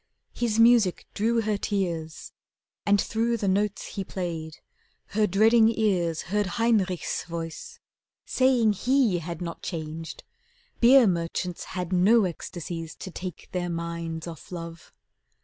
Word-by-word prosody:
His 230 -2 -1
music 230 -5 +5
drew 230 +2 +1
her 215 -1 0
tears, 170 -7 -3 0.6
And 205 0 +5
through 230 +3 0
the 205 - -2
notes 200 +2 0
he 195 - -4
played, 165 -4 -5 0.5
her 210 +1 +2
dreading 220 +4 +5
ears 185 -8 0
Heard 205 +2 0
Heinrich's 210 -6 +1
voice, 165 -1 -7 0.5
saying 250 -5 +3
he 245 -3 +2
had 170 +1 -6
not 170 -1 -6
changed; 160 -1 -6 0.6
Beer 250 +1 +7
merchants 175 -1 -2
had 180 0 -3
no 205 +5 +5
ecstasies 170 -1 -6
to 190 - -8
take 180 -1 -7
Their 175 -1 -2
minds 170 -1 -4
off 165 -1 -10
love. 170 -2 -8
185 Hz, 130 wpm, -26 LUFS, 170-220 Hz, 0.6 s, Beer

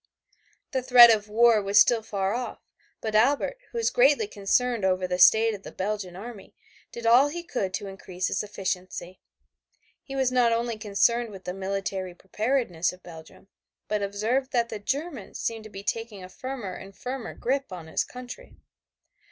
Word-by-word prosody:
The 260 - 0
threat 245 -2 +9
of 210 -1 0
war 225 0 +5
was 200 +1 +4
still 235 -2 +5
far 200 -3 -2
off, 245 +1 -4 0.4
but 220 -1 -3
Albert, 280 - +2
who 475 - -7
was 460 - +1
greatly - - +4
concerned 235 - 0
over 185 -1 +1
the 180 0 -2
state 220 +5 +6
of 200 - -7
the - - -10
Belgian 195 -2 -4
army, 215 +1 -10 0.4
did 235 - -8
all 245 +5 +6
he 340 +4 -5
could 200 - -3
to 205 - -5
increase 190 -2 -5
its - - -1
efficiency. 185 -3 -5 0.8
He 270 - -9
was 265 -2 +1
not 245 -2 +3
only 230 0 0
concerned 230 +3 +1
with 195 -3 -11
the 180 - -4
military 195 -1 -4
preparedness 200 -3 -1
of 180 0 -16
Belgium, 165 +3 -13 0.4
but 210 -1 -1
observed 220 +7 -1
that 235 -2 +1
the 215 - -5
Germans 275 - -4
seemed 225 -1 -3
to - - -9
be 195 -1 -9
taking 225 -3 -4
a 185 - -10
firmer 245 -2 -6
and 195 +1 -11
firmer 255 -2 -6
grip 270 -1 -2
on 175 -3 -7
his 160 - -1
country. 250 - -11
215 Hz, 175 wpm, -26 LUFS, 195-250 Hz, 0.8 s, threat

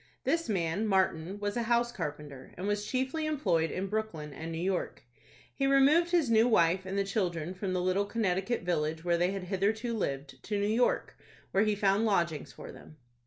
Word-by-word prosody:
This 330 0 0
man, 185 +2 0
Martin, 190 -1 0
was 205 +1 -2
a 240 - 0
house 235 +1 +1
carpenter, 145 - -7
and 185 - -4
was 205 0 -1
chiefly 265 +5 -1
employed 180 - +1
in 185 - -3
Brooklyn 195 -8 -4
and 160 +3 -6
New 165 - -4
York. 185 +2 -2 0.5
He 275 - 0
removed 280 +5 +5
his 345 -5 +2
new 225 +1 +5
wife 185 -4 +3
and 195 +1 -3
the 200 - +2
children 180 -4 -2
from 185 0 -3
the 180 - 0
little 185 +2 +1
Connecticut 200 0 -1
village, 160 -1 -1
where 170 -1 +2
they 175 +1 +2
had 195 -1 -4
hitherto 210 +5 -1
lived, 140 -8 -4
to 210 -1 -2
New 200 - +1
York, 225 +4 +1 0.3
where 195 +3 +3
he 210 -1 +1
found 200 +1 +2
lodgings 170 -7 0
for - - -10
them. 155 - -14
195 Hz, 195 wpm, -30 LUFS, 170-225 Hz, 0.5 s, removed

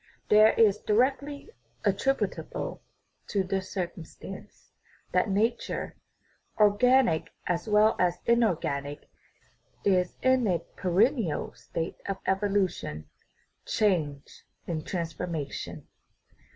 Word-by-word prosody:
This 215 +1 +6
is 210 -3 +5
directly 275 - 0 0.3
attributable 210 +7 -1 0.5
to 200 -2 0
the 190 +1 -1
circumstance 180 -3 -7 0.4
that - - +2
nature 220 +5 -1 0.6
organic 215 -2 +4 0.2
as 175 +1 -1
well 215 +1 +4
as 175 -1 +2
inorganic 155 -11 0 0.7
is 180 -2 +2
in 260 -3 +4
a 180 -3 +2 0.2
per 185 - -3
ennial 210 - +1
state 165 +2 -5
of 195 -1 -2
evolution, 190 - -1 0.5
change, 160 -10 -1 0.2
and 155 -3 -4
transformation. 165 -4 -4
195 Hz, 90 wpm, -28 LUFS, 170-220 Hz, 0.7 s, This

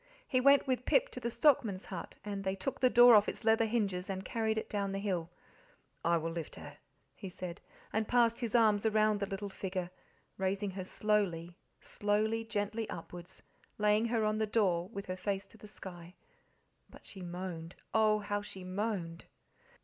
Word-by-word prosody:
He 255 - +2
went 280 +1 +6
with 255 -2 -1
Pip - - +3
to - - -7
the 235 -1 -2
stockman's 230 - +2
hut; 180 -3 -7
and 200 -1 -4
they 190 0 -1
took 195 +8 -4
the 255 - +5
door 245 0 +8
off 210 -1 +6
its - - -7
leather 225 0 +4
hinges 200 -5 -1
and 190 0 -4
carried 220 -1 -1
it 220 - -2
down 200 -2 -2
the - - -2
hill. 185 -5 -2 0.7
"I 170 0 +3
will 165 0 -3
lift 165 -1 -6
her," - - -10 0.4
he 195 - -8
said, 180 0 -7 0.3
and 220 0 0
passed 235 -1 +3
his 235 -2 -2
arms 215 -3 +4
around 215 -1 +3
the 200 - -2
little 195 +1 -5
figure, 185 -2 -4 0.5
raising 195 +1 -1
her 190 0 -5
slowly, 185 -5 -1 0.2
slowly, 215 +2 0
gently 215 0 -2
upwards, 175 +2 -9 0.3
laying 210 +1 +3
her 230 -2 +1
on 215 0 0
the 220 - +1
door 190 -5 +1
with 200 -3 -6
her 185 - -4
face 195 +1 -2
to 225 - -17
the 210 - -11
sky. 180 -3 -10 0.7
But - - -16
she 195 - -9
moaned 175 -1 -6 0.2
oh, 215 -1 +4
how 205 0 -2
she 190 -2 -9
moaned! 185 -3 -3
205 Hz, 185 wpm, -33 LUFS, 185-220 Hz, 0.7 s, door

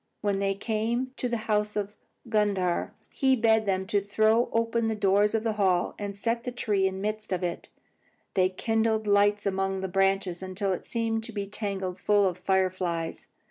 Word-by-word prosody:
When 200 -1 0
they 195 0 0
came 230 +5 -1
to 250 - -2
the 235 - 0
house 210 -1 0
of 205 0 -3 0.3
Gundhar, 200 -5 +1 0.2
he 265 -2 +3
bade 220 -2 +3
them 190 -1 0
throw 215 +4 +2
open 230 0 +1
the 220 - 0
doors 205 +1 +3
of 225 - 0
the 225 -1 0
hall 180 -2 +2
and 200 -1 -4
set 230 +3 -1
the 250 - -3
tree 205 -5 +1
in 190 - -3
the 190 - -6
midst 215 +1 -3
of 185 -1 -1
it. 175 -1 -4 0.6
They 185 -1 +3
kindled 220 +2 0
lights 205 0 +3
among 195 -1 -1
the 190 - -2
branches 195 -1 +1
until 190 +1 -2
it - - -6
seemed 225 -1 -1
to 230 - -7
be 205 -2 -3
tangled 195 -3 -4
full 205 0 +3
of 180 -1 -3
fire 190 0 +2
flies. 170 -3 -4
205 Hz, 190 wpm, -27 LUFS, 190-220 Hz, 0.6 s, he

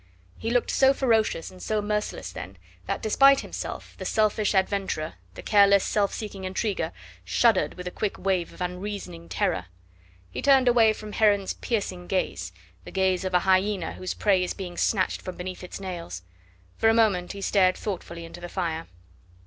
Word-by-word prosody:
He 225 - -2
looked 245 0 +1
so 270 0 +4
ferocious 225 -10 +1
and 185 -1 -14
so 215 -1 0
merciless 210 - -2
then, 95 +1 -8 0.3
that - - -2
despite 275 +5 +5
himself, - - -6
the - - -4
selfish 215 -1 +1
adventurer, 190 -5 0 0.2
the - - -9
careless 200 -2 +5
self 205 -2 +1
seeking 205 -3 -6
intriguer, 190 -2 -1 0.3
shuddered 200 - +2
with 180 0 -7
a - - -3
quick 210 +1 -2
wave 185 -3 0
of - - -13
unreasoning 180 -2 -5
terror. 180 - -1 0.6
He - - -4
turned 270 -2 +5
away 230 -3 +5
from 215 0 -9
Heron's 205 -3 +2
piercing 185 -6 -3
gaze, 190 -1 -1 0.3
the - - -10
gaze 190 -1 +1
of 185 -1 -1
a 180 - +5
hyena 190 -1 +1
whose 185 - -5
prey 195 -3 +3
is 180 - -3
being 180 -3 -6
snatched 190 -1 +1
from 185 - -7
beneath 185 +1 -6
its 180 - -7
nails. 170 - -6 0.5
For 225 - +4
a 225 - +4
moment 200 -6 +2
he 200 - -8
stared 185 -3 +3
thoughtfully 170 -4 -5
into 170 +1 -11
the 175 - -6
fire. 165 -3 -3
190 Hz, 175 wpm, -26 LUFS, 180-215 Hz, 0.6 s, despite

